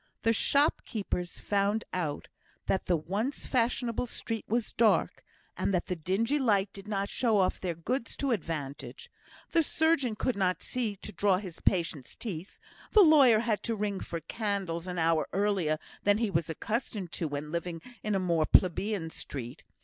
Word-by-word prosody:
The 225 - +4
shopkeepers 220 - 0
found 205 +2 0
out 155 -5 -2 0.4
that 190 - 0
the 175 - +3
once 205 - -3
fashionable 245 -1 0
street 225 -1 -4
was 235 +1 -1
dark, 225 -2 +2 0.3
and - - 0
that 175 - 0
the 180 - -2
dingy 205 - 0
light 205 -6 +2
did 200 +1 -10
not 200 -1 -1
show 225 -2 +1
off 185 -2 +2
their 175 -3 -2
goods 230 - -3
to 275 -2 0
advantage; 155 - -4 0.4
the 335 - +5
surgeon 315 -7 +2
could 250 +3 0
not 185 -3 0
see 235 -5 -2
to 205 - -8
draw 200 -3 +2
his 185 -4 -7
patient's 165 -7 0
teeth; 190 -5 -6 0.4
the 430 - +8
lawyer 275 -9 +7
had 225 -3 0
to 230 - -2
ring 205 -2 -2
for 170 -1 -5
candles 195 -6 -3
an 180 -1 -4
hour 165 -1 +2
earlier 195 -6 +1 0.2
than 205 0 +3
he 220 -2 0
was 165 -2 0
accustomed 205 0 -3
to 170 - -3
do - - 0
when 145 +1 -5
living 170 0 -3 0.2
in 210 -1 -1
a - - +2
more 170 -4 +1
plebeian 185 -1 +2
street. 125 -6 -7
200 Hz, 170 wpm, -30 LUFS, 170-225 Hz, 0.4 s, the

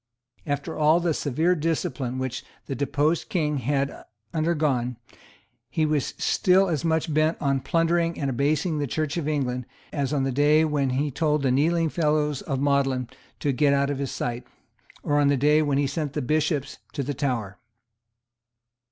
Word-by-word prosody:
After 145 +2 -2
all 155 +2 +4
the 170 -2 0
severe 155 +6 +1
discipline 145 -6 -2
which 130 -1 -3 0.2
the - - -4
deposed 145 - 0
King 150 -8 0
had 140 +2 0 0.4
undergone, 150 -7 0 0.7
he 160 - +1
was 150 -3 -1
still 190 +1 +3
as 160 -3 -1
much 160 -1 0
bent 155 +2 +2
on 135 -1 +1
plundering 165 +3 +1
and 140 - -1
abasing 150 +5 0
the 145 - -1
Church 155 +2 -2
of 165 -4 -2
England 125 -5 -1 0.3
as 140 -2 -1
on 145 -3 +1
the 135 - 0
day 150 +4 +4
when 145 -3 0
he 140 +3 0
told 150 +1 0
the 130 - +2
kneeling 165 +5 +2
fellows 150 -3 0
of 135 - -3
Magdalene 135 -3 +1 0.3
to 145 - +1
get 140 +2 +3
out 140 0 +1
of 140 - -3
his 140 -2 -2
sight, 120 0 -3 0.6
or 145 0 +2
on 145 - +4
the 140 0 +3
day 150 +3 +4
when 145 -2 +1
he 140 - +2
sent 145 +1 -3
the - - -2
Bishops 150 +1 -1
to 140 - -2
the 145 +2 -3
Tower. 125 -9 -2
145 Hz, 175 wpm, -25 LUFS, 135-155 Hz, 0.7 s, all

